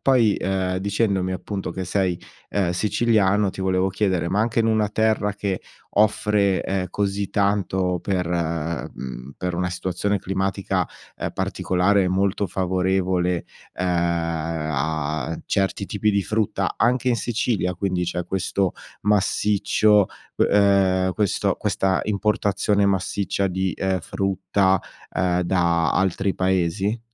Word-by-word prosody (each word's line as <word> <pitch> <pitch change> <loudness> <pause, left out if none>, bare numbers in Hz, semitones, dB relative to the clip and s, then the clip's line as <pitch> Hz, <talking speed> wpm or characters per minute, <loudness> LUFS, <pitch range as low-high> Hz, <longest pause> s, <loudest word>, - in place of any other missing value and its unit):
poi, 120 -6 +3
ehm, 95 -1 -1
dicendomi 100 -1 0
appunto 95 +1 -4
che 95 - -4
sei, 90 -1 0 0.3
ehm, 95 -4 +1
siciliano 105 0 +2
ti 95 - -8
volevo 95 0 +1
chiedere: 95 -3 0
ma 95 - 0
anche 115 +1 +2
in 115 - +2
una 110 -2 +2
terra 110 -1 +1
che 100 -2 -2 0.3
offre, 105 -2 +2
ehm, 95 -1 -1
così 100 -1 -1
tanto 95 -3 +1
per 90 -3 -1
mhmm, 80 -6 -3
per 90 -1 -3
una 90 0 -1
situazione 95 +3 -1
climatica, 95 -1 -1 0.3
ehm, - - -4
particolare, 95 +1 +1
molto 95 +2 +1
favorevole, 90 -1 0 0.3
uhm, 90 - -3 0.9
a 80 +2 -2
certi 100 0 0
tipi 105 +1 0
di 100 -1 +2
frutta, 105 -3 -1
anche 125 +2 +2
in 120 - +2
Sicilia 110 -6 -1
quindi 90 -1 -1
c'è 90 0 -3
questo 95 0 0 0.3
massiccio 105 0 +3 0.3
uhm, 95 -2 +3
questo 105 -2 0
questa 95 -1 0
importazione 100 -1 +1
massiccia 100 +1 -1
di, 95 +1 -1
ehm, 95 -1 0
frutta, 95 +1 +1 0.3
ehm, 90 -1 +1
da 85 -2 +2
altri 95 +1 +1
paesi? 95 +4 0
95 Hz, 125 wpm, -23 LUFS, 90-100 Hz, 0.9 s, poi